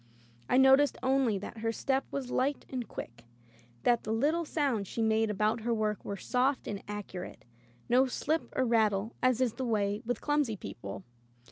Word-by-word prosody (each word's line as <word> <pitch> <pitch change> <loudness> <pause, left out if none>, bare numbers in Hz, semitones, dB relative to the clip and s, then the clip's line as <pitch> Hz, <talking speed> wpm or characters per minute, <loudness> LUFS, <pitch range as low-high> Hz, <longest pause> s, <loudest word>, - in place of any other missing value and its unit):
I - - +4
noticed 265 +2 +6
only 260 -5 +2
that 205 +3 -7
her 225 +1 0
step 265 +3 0
was 260 -3 -4
light 275 +2 0
and 250 -3 -3
quick, 115 0 -8 0.6
that 240 -1 +3
the 215 - -3
little 300 +9 +1
sounds 270 - 0
she - - -6
made 220 0 +2
about 210 +2 +1
her 235 +1 0
work 215 -1 -1
were 200 - -4
soft 255 +6 0
and 200 -1 -4
accurate; 205 -3 -7 0.4
no 255 +2 +4
slip 315 +5 -1
or 260 - +2
rattle 220 -2 +2
as 255 -1 +3
is 245 -4 +2
the 260 - -4
way 205 -2 0
with 240 0 -2
clumsy 290 -7 0
people. 100 - -7
230 Hz, 175 wpm, -31 LUFS, 210-265 Hz, 0.6 s, noticed